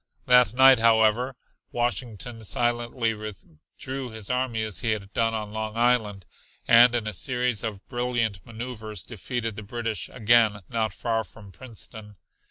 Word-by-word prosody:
That 125 -3 +5
night, 130 -1 +7
however, 115 +3 +3 0.4
Washington 120 -1 -3
silently 120 0 -1
withdrew 110 - -8
his 110 -1 -5
army 125 -3 -1
as 110 -3 -2
he 110 -1 +1
had 100 -1 -7
done 115 -1 +1
on 105 -1 -4
Long 110 0 -4
Island 110 -6 +1 0.4
and 120 +1 +7
in 115 -2 -1
a 110 - -3
series 125 +1 0
of 105 -3 -5
brilliant 120 -5 -2
maneuvers 110 -4 -7
defeated 115 0 -4
the - - -5
British 115 0 -4
again 110 -3 +3
not 110 -2 -1
far 115 -2 -1
from 105 -3 -14
Princeton. 110 -2 -10
115 Hz, 145 wpm, -25 LUFS, 110-120 Hz, 0.4 s, night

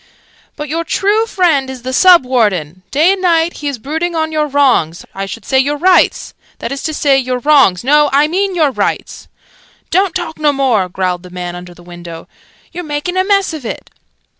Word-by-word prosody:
"But 300 0 -6
your 325 +3 -2
true 415 +6 0
friend 325 -10 +1
is 260 -2 -8
the 260 +1 -4
Sub 355 -1 +6
Warden! 190 - 0
Day 310 - +3
and 390 - -5
night 335 -2 +1
he 295 - -5
is 280 -3 -3
brooding 320 +8 -3
on 315 0 -1
your 305 -1 0
wrongs 255 - +1
I 195 0 -5
should 215 +2 -8
say 265 - +2
your 290 +2 0
rights 360 +4 +2 0.2
that - - -6
is 275 - -4
to 315 - -2
say 275 -2 +2
your 255 -1 -2
wrongs 260 -9 +3
no, 295 +3 +3
I 285 +2 +3
mean 380 +3 -1
your 310 -5 +2
rights 210 -5 -3 0.3
" - - -32
("Don't 375 +2 +1
talk 345 -4 -4
no 300 -1 +3
more!" 245 -9 +1
growled 180 -1 -2
the 180 - -13
man 180 -1 -6
under 175 0 -10
the 175 - -17
window. 175 -1 -10 0.4
"You're 355 - -6
making 300 +3 -4
a 375 - +2
mess 395 -3 +1
of 310 -4 -7
it!") 230 - -7
285 Hz, 210 wpm, -14 LUFS, 215-330 Hz, 0.4 s, Sub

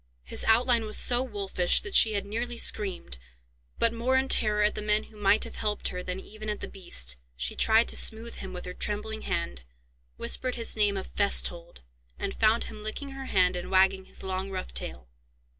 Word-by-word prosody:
His 65 - -2
outline 235 0 +3
was 215 - 0
so 245 0 +6
wolfish, 200 -7 0
that 390 -2 -7
she 220 - +6
had 200 -1 -2
nearly 235 +3 -4
screamed: 185 - +1 0.6
but, 230 0 +3
more 250 +3 +1
in 265 0 0
terror 210 -1 +3
at 210 - +2
the - - -5
men 210 +1 +2
who 220 - -18
might 205 0 +2
have - - -8
helped 210 -1 -1
her 180 - -5
than 180 +1 -5
even 215 +2 -8
at 210 - -3
the - - -6
beast, 65 - -3 0.2
she 65 +1 -2
tried 225 +1 +4
to - - -5
smooth 230 +1 +1
him 190 - -8
with 180 -1 -8
her 180 - -6
trembling 215 +3 -2
hand, 65 -2 -3 0.6
whispered 255 -1 0
his 230 -1 -2
name 205 -2 +2
of 190 - -5
"Festhold," 175 - +1 0.4
and 195 - -4
found 225 +1 +2
him 215 - -9
licking 215 +6 -5
her 270 0 -8
hand, 180 -1 +2
and 175 - -5
wagging 190 0 +3
his - - -8
long 190 0 -3
rough 185 -1 -6
tail. 60 -1 -4
210 Hz, 205 wpm, -27 LUFS, 185-225 Hz, 0.6 s, so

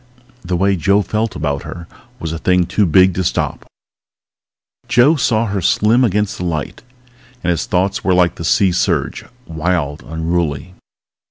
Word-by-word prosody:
The 90 0 -2
way 100 +1 +2
Joe 100 +6 +2
felt 110 0 -2
about 70 -1 -2
her 85 -1 -9 0.3
was 80 -1 -4
a 80 - -5
thing 90 0 +2
too 100 +2 +1
big 95 +3 +5
to 95 - -2
stop... - - -2 1.2
Joe 130 +7 +4
saw 115 -5 +1
her 100 -2 -2
slim 110 +8 +3
against 105 -2 0
the - - -3
light, 80 -5 -4 0.6
and 90 - +1
his 85 - -2
thoughts 95 +2 0
were 95 - +2
like 90 -1 +3
the - - -8
sea 95 +2 +3
surge, 90 - -1 0.2
wild, 80 -3 -2
unruly. 80 0 -3
90 Hz, 160 wpm, -17 LUFS, 85-100 Hz, 1.2 s, big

